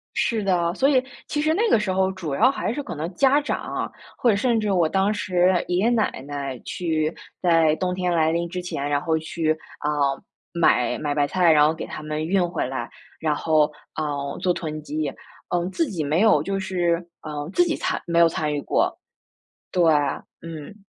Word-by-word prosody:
是 225 -2 +1
的， 175 -3 +1
所 270 +6 +3
以 265 -3 +4 0.3
其 295 - -1
实 310 +1 +2
那 445 +6 +2
个 - - +5
时 210 -3 -1
候 190 0 +2
主 170 -7 -4
要 230 - +5
还 275 - -2
是 290 - -3
可 285 - -6
能 160 +4 -4
家 275 +7 +4
长 295 - -2
啊， - - -4 0.3
或 245 - +1
者 220 - +5
甚 235 +2 +2
至 210 -1 -1
我 175 -4 +3
当 195 +4 +2
时 185 -3 +2
爷 175 - +1
爷 200 +6 +3
奶 230 -3 +2 0.2
奶 140 -3 -4
去 160 -2 -1 0.3
在 165 -3 +4
冬 180 +1 -1
天 180 -1 -1
来 160 -1 +2
临 170 +1 -1
之 180 +1 -4
前， 155 -5 -3
然 145 -1 +2
后 160 +1 0
去， 160 0 -1 0.3
啊， 150 - -2 0.6
买 165 -7 +2
买 145 -1 -2
白 145 -1 +2
菜， 175 -1 +4
然 150 -1 +6
后 155 - +2
给 160 - -6
他 - - -7
们 155 +1 -3
运 180 0 +2
回 170 -6 -1
来， 130 +1 -4 0.3
然 155 -2 +1
后， 155 -1 +2 0.2
呃， 145 -2 -3
做 180 - +2
囤 155 -3 -5
积。 150 -1 -3 0.4
嗯， 175 0 +1
自 330 - 0
己 170 -6 -2
没 150 +4 +1
有 215 -9 +5
就 195 +1 -2
是 175 -2 -1
呃， 150 -1 -5
自 355 - +4
己 335 -2 0
参 - - -2
没 170 0 +2
有 170 - +7
参 155 -2 -2
与 145 - -1
过， - - 0 0.7
对， 180 - +1 0.6
嗯。 165 +5 -9
170 Hz, 225 characters per minute, -23 LUFS, 155-195 Hz, 0.7 s, 有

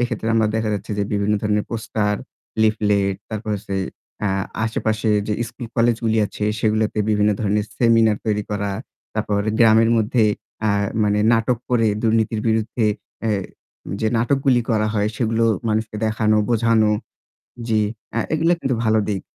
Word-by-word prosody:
এক্ষেত্রে 115 -2 -1
আমরা 110 -1 +3
দেখা 110 -1 0
যাচ্ছে 100 +2 -6
যে - - +2
বিভিন্ন 100 +1 +1
ধরনের 105 0 +1
পোস্টার, 110 -2 -1 0.5
লিফলেট, 105 -2 +2 0.2
তারপর 110 0 -4
হচ্ছে 100 -1 -5 0.5
আ - - +2 0.4
আশেপাশে 110 0 -1 0.2
যে 105 - -1 0.2
স্কুল 120 0 -8
কলেজগুলি 115 -1 +2
আছে 105 - -5 0.2
সেগুলোতে 110 0 +1
বিভিন্ন 105 0 +3
ধরনের 105 -1 +1
সেমিনার 115 -3 +4
তৈরি 105 -1 0
করা। 100 -1 -2 0.4
তারপর 100 -1 0 0.2
গ্রামের 115 0 +5
মধ্যে 115 +1 +2 0.4
আ - - +3 0.4
মানে 105 0 +2
নাটক 115 +1 +2
করে 115 -2 +3 0.2
দুর্নীতির 110 -1 +1
বিরুদ্ধে 110 +1 0 0.4
এ্যা 115 - 0 0.7
যে 110 - +1
নাটকগুলো 130 +2 +2
করা 110 -1 +2
হয় 105 0 +1
সেগুলো 115 0 +1 0.2
মানুষকে 110 0 -1
দেখানো, 110 0 +2
বোঝানো। 115 -2 +3 0.8
জি 110 -1 +2 0.4
আ - - +2 0.2
এগুলো 165 +2 +3
কিন্তু 135 -4 0
ভালো 110 0 +3
দিক। 100 -2 -1
110 Hz, 145 wpm, -21 LUFS, 105-115 Hz, 0.8 s, গ্রামের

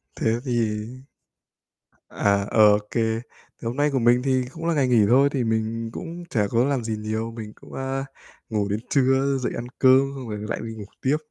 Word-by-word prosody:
Thế 115 +1 0
thì 110 -4 0 1.2
À, 100 -1 +1 0.3
OK. 105 0 -5
Thì 115 -1 0 0.4
hôm 115 0 -3
nay 145 +1 +3
của 135 - +1
mình 120 +1 +4
thì 130 -2 +1
cũng 165 0 -7
là 170 - +2
ngày 140 -4 +2
nghỉ 115 -4 +4
thôi, 135 +4 +5
thì 135 -4 0
mình 115 0 -1
cũng 170 0 -7
chả 105 - +1
có 115 +4 +2
làm 135 -3 0
gì 110 -1 -2
nhiều. 110 +2 -3
Mình 110 -2 -8
cũng, - - -16
a, 135 0 -3 0.4
ngủ 105 -3 0
đến 105 +1 -1
trưa, 135 0 +2
dậy 130 - -2
ăn 120 - -5
cơm, 130 0 +7 0.2
xong 130 -4 -7
rồi 105 -1 -4
lại - - -2
đi 115 0 -6
ngủ 110 -2 -8 0.2
tiếp. 135 +3 +2
120 Hz, 200 wpm, -24 LUFS, 110-135 Hz, 1.2 s, cơm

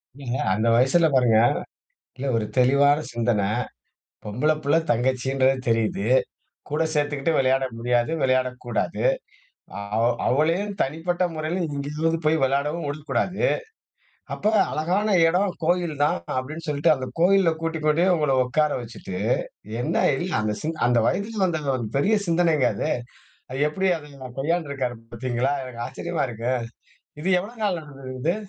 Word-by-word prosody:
இல்லிங்க 135 -2 -4 0.2
அந்த 110 +3 0
வயசுல 135 +7 +4
பாருங்க. 120 -4 +4 0.8
இல்ல 135 +2 -4
ஒரு 110 - 0
தெளிவான 140 +3 +5
சிந்தனை 115 -4 +1 0.8
பொம்பள 120 +9 0
புள்ளை 145 +3 +3
தங்கச்சின்றது 130 +2 +2
தெரியுது 110 -3 +1 0.6
கூட 150 +2 0
சேர்த்துக்குட்டு 145 +1 0
விளையாட 135 0 +2
முடியாது 120 +2 +1
விளையாட 130 -1 +2 0.2
கூடாது. 120 - -2 0.9
அவ 115 - +2 0.2
அவளையும் 170 +9 +1
தனிப்பட்ட 165 +5 -2
முறையில 160 +4 -2
எங்கேயாவது 150 +4 -1
போய் 160 -1 +3
விளையாடவும் 145 +4 0
ஒடிக்கூடாது 155 +6 -2 0.9
அப்ப 215 +1 0 0.2
அழகான 185 +7 0 0.2
இடம் 180 +3 +2
கோயில்தான் 160 -4 +1 0.2
அப்டின்னு 155 +6 -4
சொல்ட்டு 150 +2 +3
அந்த 130 -1 -5
கோயில 190 0 +5
கூட்டி 165 0 -2
கொண்டே 155 +4 +3
உங்கள 150 -4 +1
உட்கார 150 +4 +1
வச்சுட்டு 110 -5 -8 0.7
என்ன - - -2 0.2
இல்ல 180 +6 -3
அந்த 105 -1 -1
சிந்த 160 +1 -3
அந்த 120 -1 +3
வயதில் 200 +2 -1
வந்த 165 -3 -1 0.2
ஒரு 120 -3 -3
பெரிய 210 +10 +3
சிந்தனைங்க 165 -6 +3
அது. 100 - -2 0.6
அது 130 - -4
எப்டி 190 +4 0
அத 140 -4 -11
கையாண்டுருக்காரு 140 -5 -1 0.2
பார்த்தீங்களா 125 +3 -1
எனக்கு 120 -2 -6
ஆச்சரியமா 165 +3 -3
இருக்கு 115 +3 -2 0.7
இது 185 - -1
எவ்வளோ 215 +6 -8
நாள் 190 -4 +1
நடந்திருக்குது. 135 +3 -4
145 Hz, 130 wpm, -24 LUFS, 130-165 Hz, 0.9 s, தெளிவான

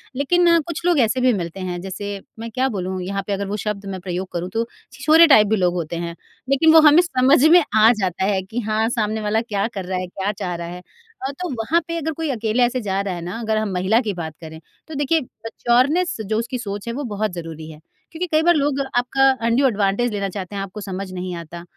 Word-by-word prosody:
लेकिन 335 +5 +3
कुछ 335 +1 -6
लोग 350 -4 +3
ऐसे 250 +1 +2
भी 255 -1 +4
मिलते 175 -2 -4
हैं 180 -1 -4
जैसे 200 +2 -5 0.2
मैं 230 +1 -5
क्या 255 +4 0
बोलूँ 190 -4 -3
यहाँ 195 +2 -3
पे 205 - -1
अगर 200 0 -3
वो 205 +2 -3
शब्द 210 -1 -4
मैं 195 -1 -5
प्रयोग 180 +1 -4
करूँ 175 +1 -3
तो 230 +1 -1 0.3
छिछोरे 320 +2 +6
टाइप 215 -8 +6
भी 220 - +2
लोग 180 -3 +1
होते 170 -1 -3
हैं 170 0 -4 0.3
लेकिन 315 +4 +5
वो 320 - +9
हमें 305 +2 +7
समझ 275 -4 +3
में 345 +1 +7
आ 220 +2 +7
जाता 190 -1 -1
है 195 -1 +1
कि 205 +6 -5
हाँ 220 +1 +1
सामने 220 -2 -1
वाला 215 +1 +1
क्या 210 -3 -2
कर 200 -5 -6
रहा 185 0 -2
है? 185 - -4
क्या 195 +3 -3
चाह 190 -4 -4
रहा 170 0 -5
है? 180 +1 -8 0.5
अ, - - -3
तो 355 +6 -5
वहाँ 235 +8 +1
पे 335 - -3
अगर 320 -1 -2
कोई 320 -1 -3
अकेले 230 0 0
ऐसे 245 +1 +1
जा 195 -3 -1
रहा 200 -2 -3
है 175 - -6
ना 180 +6 -5
अगर 220 -2 -1
हम 215 -2 -1
महिला 190 +5 +2
की 215 -5 -3
बात 165 -3 -6
करें 160 -1 -9 0.3
तो 315 - -9
देखिए, 290 +3 +1
मैच्योरनेस 255 +8 0
जो 215 +2 -1
उसकी 235 +2 -3
सोच 205 -2 -6
है 235 - -2
वो 285 +4 -4
बहुत 215 -3 -2
ज़रूरी 160 -2 -7
है 150 - -13 0.3
क्योंकि 345 +3 -3
कई 310 0 +4
बार 345 +1 +5
लोग 285 -2 +1 0.2
आपका 270 +2 +3 0.2
अंड्यू 240 +4 +3
एडवांटेज 210 +1 0
लेना 200 -1 -2
चाहते 195 +1 -6
हैं 200 - -2
आपको 195 +2 -7
समझ 195 -1 -5
नहीं 180 0 -4
आता, 170 0 -8
215 Hz, 245 wpm, -21 LUFS, 190-260 Hz, 0.5 s, वो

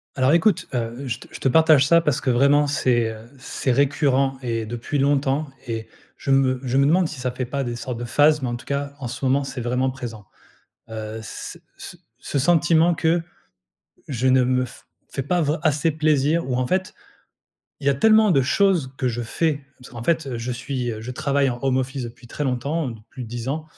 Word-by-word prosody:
Alors 130 +2 +3
écoute, 170 +2 +3
heu, 120 +3 -3
je 120 -1 -3
te - - -13
je - - -8
te - - 0
partage 155 -1 +5
ça 170 +3 +5
parce 150 -4 0
que 140 - -2
vraiment 140 +4 +4
c'est, 120 -5 +1
heu, 110 +2 -11
c'est 130 0 -2
récurrent 135 0 +2
et 115 -3 -2
depuis 120 +5 -4
longtemps 140 +1 +1 0.2
et 115 -1 -4 0.3
je 135 - -2
me 130 -1 +3
je 130 0 0
me 140 - +4
demande 175 +3 +3
si 155 -3 -8
ça 125 0 -1
fait 125 +1 -4
pas 140 +3 -3
des 120 -2 -3
sortes 120 0 -5
de 120 - -4
phases, 150 +5 +3
mais 130 - -2
en 120 - -2
tout 120 - -10
cas 140 0 -3
en 130 - -4
ce 120 +3 -7
moment, 135 +2 +2
c'est 135 -2 -5
vraiment 125 +2 0
présent. 115 -5 -8 0.6
Heu, 110 0 -6
ce 110 - -8 0.2
ce - - -9 0.2
ce - - -3
sentiment 170 +3 +4
que, 165 +1 +1 0.9
je 130 -1 0
ne 130 0 +4
me 125 0 +1
f 125 - -12 0.2
fais 135 - -3
pas 175 +7 0
vr 150 +2 0
assez 155 +1 +2
plaisir, 155 0 +1
ou 130 - -1
en 130 0 0
fait 185 +5 -1 0.9
Il - - -6
y - - +6
a - - +2
tellement 215 +8 +5
de 135 - +4
choses, 170 -2 +2
que 130 - 0
je 120 0 -3
fais, 145 +4 -1
parce 125 - -14
qu'en 120 -3 -8
fait, 165 +4 +1
heu, 125 -3 -4
je 120 +2 -3
suis, 125 0 -3
heu, 110 - -7
je 115 +3 -6
travaille 140 +2 +1
en 120 - -5
home 130 -1 +2
office 130 +1 -3
depuis 120 +1 -10
très 145 - -4
longtemps, 135 +3 -1
heu, - - -7
depuis 115 +4 -10
10 120 +2 -6
ans. 155 +3 -2
135 Hz, 225 wpm, -23 LUFS, 120-150 Hz, 0.9 s, y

